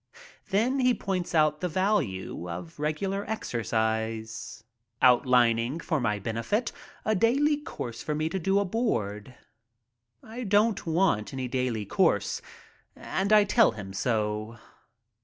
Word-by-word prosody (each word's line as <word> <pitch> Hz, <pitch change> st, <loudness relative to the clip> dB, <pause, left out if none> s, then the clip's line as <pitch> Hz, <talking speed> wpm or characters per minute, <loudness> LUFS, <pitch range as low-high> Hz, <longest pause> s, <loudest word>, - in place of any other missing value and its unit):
Then 230 Hz, +7 st, +1 dB
he 250 Hz, -1 st, +3 dB
points 185 Hz, -3 st, -3 dB
out 155 Hz, -1 st, +3 dB
the 180 Hz, -, -1 dB
value 155 Hz, -, -1 dB
of 85 Hz, -, -7 dB
regular 190 Hz, +7 st, -1 dB
exercise, 110 Hz, -, -2 dB, 0.4 s
outlining 125 Hz, +1 st, +4 dB
for 160 Hz, -2 st, -1 dB
my 105 Hz, -3 st, 0 dB
benefit 115 Hz, -, -2 dB, 0.3 s
a 215 Hz, -, +2 dB
daily 275 Hz, +9 st, +3 dB
course 125 Hz, -, -7 dB
for 150 Hz, -, -2 dB
me 155 Hz, +1 st, 0 dB
to 190 Hz, -, -2 dB
do 195 Hz, +3 st, +1 dB
aboard. 130 Hz, -, -1 dB, 0.9 s
I 230 Hz, +3 st, -7 dB
don't 210 Hz, -1 st, +2 dB
want 160 Hz, -, +1 dB
any 130 Hz, -1 st, -3 dB
daily 125 Hz, -4 st, -1 dB
course -, -, +1 dB, 0.5 s
and 195 Hz, +2 st, -2 dB
I 210 Hz, -1 st, +7 dB
tell 215 Hz, -, +4 dB
him 100 Hz, -3 st, -8 dB
so. 110 Hz, +1 st, -1 dB
150 Hz, 125 wpm, -27 LUFS, -, 0.9 s, I